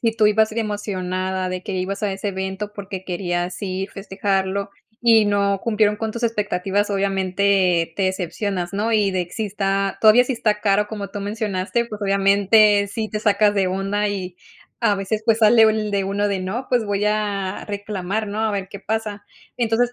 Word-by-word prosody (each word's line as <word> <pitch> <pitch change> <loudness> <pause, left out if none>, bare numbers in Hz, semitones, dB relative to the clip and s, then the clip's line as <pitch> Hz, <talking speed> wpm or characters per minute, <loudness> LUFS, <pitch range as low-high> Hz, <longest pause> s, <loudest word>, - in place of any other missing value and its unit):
sí 230 -2 +1
tu 215 - +4
ibas 215 +1 +3
emocionada 190 -4 -2
de 185 0 -4
que 205 - -5
ibas 190 +3 -3
a 205 - +1
ese 195 +1 -3
evento 190 +2 -4
porque 195 -2 -7
querías 175 -1 -3
ir, 190 0 -3
festejarlo, 195 0 -2 0.3
y 225 -2 +5
no 200 -1 +1
cumplieron 210 -2 +2
con 220 0 -3
tus 235 +2 -6
expectativas, 205 -2 0
obviamente 190 -3 +1
te 195 - +1
decepcionas, 185 0 -2
¿no? 210 +3 -1
Y 210 -3 +3
de 185 -2 -1
que 175 - -20
sí 220 - -2
está 195 -1 -1
todavía 220 +3 +7
sí 265 - -2
está 215 -3 0
caro, 210 0 +2
como 205 -2 -5
tú 205 - -5
mencionaste, 205 +2 -2
pues 215 -2 -8
obviamente 200 +1 +4
sí 215 +1 -3
te 210 - -3
sacas 210 -1 +3
de 195 -2 +2
onda, 195 +2 -1
y 185 -3 -4 0.4
a 205 - +3
veces 195 +2 -2
pues 225 -2 +3
sale 225 +1 +6
el 215 -1 +3
de 200 -1 +1
uno 200 +1 0
de: 195 -2 -1
"No, 205 +8 -4
pues 245 -3 +2
voy 205 0 -1
a 205 -2 -1
reclamar, 205 0 -3
¿no? 210 +2 -4
A 220 - +1
ver 195 -2 -3
qué 200 -1 -9
pasa". 215 -1 -3 0.3
Entonces, 240 +1 +1
200 Hz, 190 wpm, -21 LUFS, 190-215 Hz, 0.4 s, todavía